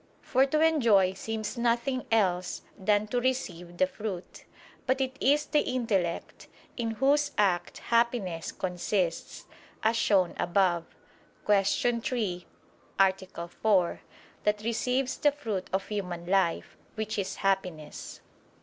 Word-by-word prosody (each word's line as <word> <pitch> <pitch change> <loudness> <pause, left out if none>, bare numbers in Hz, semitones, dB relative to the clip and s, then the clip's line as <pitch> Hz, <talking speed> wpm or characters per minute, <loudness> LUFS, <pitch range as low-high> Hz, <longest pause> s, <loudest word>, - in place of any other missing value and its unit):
For 265 +2 +3
to 305 +3 +1
enjoy 230 -13 +4
seems 220 +3 -4
nothing 240 +2 0
else 185 -5 +1
than 205 +1 +2
to 245 +2 0
receive 180 -9 -2
the 185 - +4
fruit. 190 -2 -7 0.4
But 260 +1 +2
it 260 0 -1
is 290 +2 +3
the 300 - +2
intellect, 215 -11 -1 0.3
in 235 -2 -2
whose 285 +3 +3
act 185 -4 +1
Happiness 230 -8 0
consists, 180 -1 -2 0.4
as 220 +1 +3
shown 195 -5 +3
above 175 -2 +2 0.6
(Q. 210 +4 +2
3, 205 -8 -2 0.5
A. 190 -3 +1
4), 185 -1 +1 0.4
that 210 0 +1
receives 250 +3 0
the 290 - +4
fruit 215 -9 -4
of 190 0 -1
human 180 -5 -4
life, 185 -2 0 0.2
which 215 -1 -3
is 190 - -3
Happiness. 185 -6 -2
210 Hz, 120 wpm, -29 LUFS, 185-240 Hz, 0.6 s, enjoy